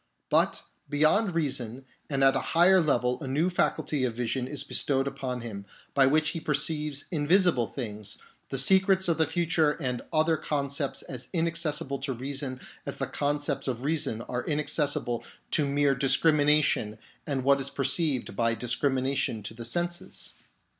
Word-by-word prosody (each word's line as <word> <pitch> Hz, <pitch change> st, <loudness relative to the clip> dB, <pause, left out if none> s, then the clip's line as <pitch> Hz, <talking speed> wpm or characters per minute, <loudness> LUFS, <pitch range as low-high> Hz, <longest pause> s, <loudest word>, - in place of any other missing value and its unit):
But -, -, +2 dB, 0.3 s
beyond 160 Hz, +6 st, +2 dB
reason 135 Hz, -5 st, -1 dB, 0.2 s
and 135 Hz, -2 st, 0 dB
at 135 Hz, 0 st, +5 dB
a -, -, +2 dB, 0.2 s
higher 185 Hz, +2 st, +7 dB
level 125 Hz, -5 st, +1 dB
a -, -, -5 dB
new 155 Hz, +7 st, +1 dB
faculty 150 Hz, -5 st, 0 dB
of 120 Hz, -3 st, -1 dB
vision 125 Hz, +1 st, -2 dB
is 145 Hz, +1 st, -5 dB
bestowed 135 Hz, -1 st, +1 dB
upon 130 Hz, -2 st, -4 dB
him, 105 Hz, -4 st, -6 dB, 0.3 s
by 135 Hz, -1 st, +5 dB
which 155 Hz, +2 st, +3 dB
he 165 Hz, -, -4 dB
perceives 150 Hz, -1 st, -1 dB
invisible 165 Hz, -, +3 dB
things, 105 Hz, -5 st, -5 dB, 0.3 s
the 135 Hz, -, -3 dB
secrets 190 Hz, +6 st, +5 dB
of 165 Hz, -1 st, +1 dB
the 160 Hz, -, +3 dB
future 165 Hz, -2 st, +1 dB
and 125 Hz, -6 st, -3 dB
other 160 Hz, +1 st, +2 dB
concepts 140 Hz, -1 st, -2 dB
as 130 Hz, -2 st, -7 dB
inaccessible 165 Hz, -4 st, -1 dB
to 135 Hz, 0 st, -3 dB
reason 130 Hz, +1 st, -4 dB, 0.2 s
as -, -, -6 dB
the -, -, -1 dB
concepts 145 Hz, 0 st, -2 dB
of 125 Hz, -1 st, -3 dB
reason 140 Hz, -7 st, -1 dB
are 125 Hz, +1 st, -3 dB
inaccessible 145 Hz, -5 st, -1 dB, 0.3 s
to 150 Hz, -3 st, +2 dB
mere 140 Hz, 0 st, +2 dB
discrimination 145 Hz, -4 st, +2 dB, 0.3 s
and 135 Hz, -3 st, -1 dB
what 140 Hz, +1 st, +4 dB
is 135 Hz, -, -4 dB
perceived 140 Hz, -, 0 dB
by 115 Hz, +2 st, +1 dB
discrimination 130 Hz, -1 st, -1 dB
to 105 Hz, -, -7 dB
the 115 Hz, +1 st, -7 dB
senses. 175 Hz, +6 st, -3 dB
140 Hz, 155 wpm, -28 LUFS, 130-155 Hz, 0.3 s, higher